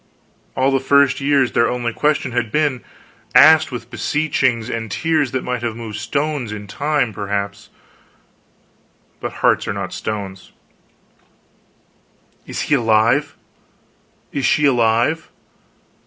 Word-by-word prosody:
All 135 +1 +2
the 135 - +2
first 140 0 +3
years, 140 -3 +2
their 115 - +2
only 120 -1 -2
question 150 -2 0
had 120 -3 -2
been 145 -5 0 0.5
asked 160 0 +7
with 120 -1 -7
beseechings 130 -6 0
and 115 -2 -4
tears 160 - 0
that 130 +1 -3
might 125 -2 -3
have 115 -2 -3
moved 110 -3 -7
stones, 140 +1 -2
in 105 -1 -7
time, 140 +2 -1
perhaps, 100 0 -4 1.5
but - - -4
hearts - - +3
are - - -1
not 100 -2 -5
stones: 100 -3 -6 1.9
"Is - - -4
he - - -1
alive?" 115 +3 +2 1.0
"Is 140 - -3
she 150 - +3
alive?" 120 +4 +2
125 Hz, 125 wpm, -19 LUFS, 110-140 Hz, 1.9 s, asked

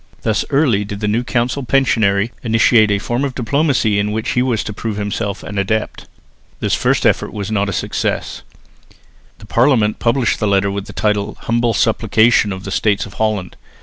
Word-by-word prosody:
Thus 110 -3 +1
early 135 -8 +2
did 100 0 -6
the 105 - -2
new 110 +4 0
council 125 +3 -1
pensionary 115 -5 +1
initiate 115 -1 +4
a 100 - +2
form 120 +5 -2
of 135 -3 -3
diplomacy 125 -4 +1
in 105 +1 -1
which 110 +3 -2
he 125 - +1
was 125 -4 0
to 105 - -6
prove 110 0 -4
himself 105 0 -3
an 105 - -4
adept. 110 +2 -2 0.5
This - - -1
first - - +1
effort - - +1
was 100 0 -5
not 100 -2 0
a - - -2
success. - - -3 1.0
The 105 - -14
Parliament 115 -2 +2
published 120 0 +1
the 105 - 0
letter 100 0 +2
with 100 0 -4
the - - -8
title 105 0 -1
"Humble 115 -1 0
Supplication 110 0 +3
of 95 0 -6
the 100 - -6
States 100 0 +1
of 100 - -12
Holland." 105 -5 -1
110 Hz, 185 wpm, -17 LUFS, 100-120 Hz, 1.0 s, initiate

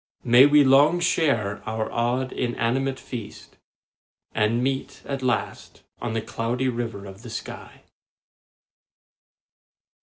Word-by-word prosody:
May 120 +4 +7
we 145 0 +6
long 140 +6 +5
share 115 - +1
our 110 0 -3
odd, 125 +2 -1
inanimate 130 +2 -1
feast, 115 -5 -9 0.7
And 110 +3 +1
meet 135 0 -3
at 140 -1 -4
last 125 -2 -3 0.2
on - - -3
the 115 -1 -2
Cloudy 120 +3 -2
River 115 -4 -4
of 95 +1 -11
the 120 - -10
sky. 115 - -8
120 Hz, 115 wpm, -24 LUFS, 115-135 Hz, 0.7 s, May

